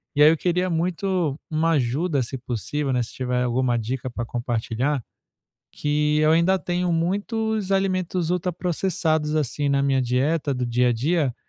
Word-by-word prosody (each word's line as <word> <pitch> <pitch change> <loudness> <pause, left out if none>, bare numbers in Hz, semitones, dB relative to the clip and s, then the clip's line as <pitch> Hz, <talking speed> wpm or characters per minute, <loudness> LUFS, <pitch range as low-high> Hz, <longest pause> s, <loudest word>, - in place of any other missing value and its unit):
E 145 - +6
aí 150 - +9
eu 165 - +1
queria 180 +2 0
muito 175 -2 -1
uma 160 +2 +2
ajuda, 140 +2 +1
se 130 +3 -5
possível, 125 - -3
né, 125 -1 +1
se - - -9
tiver 125 -1 -1
alguma 125 0 +1
dica 125 +3 -3
pra 120 0 -4
compartilhar, 120 +3 -2 0.7
que 150 0 +1
eu 155 - +4
ainda 170 +4 +4
tenho 175 0 -1
muitos 205 +4 -1
alimentos 185 -3 0
ultra 180 0 0
processados, 165 -3 0
assim, 145 0 -1
na 140 0 +2
minha 135 -1 +2
dieta 140 +4 0
do 125 -1 -2
dia 125 +1 +2
a - - +3
dia, 140 +1 0
150 Hz, 165 wpm, -23 LUFS, 125-175 Hz, 0.7 s, aí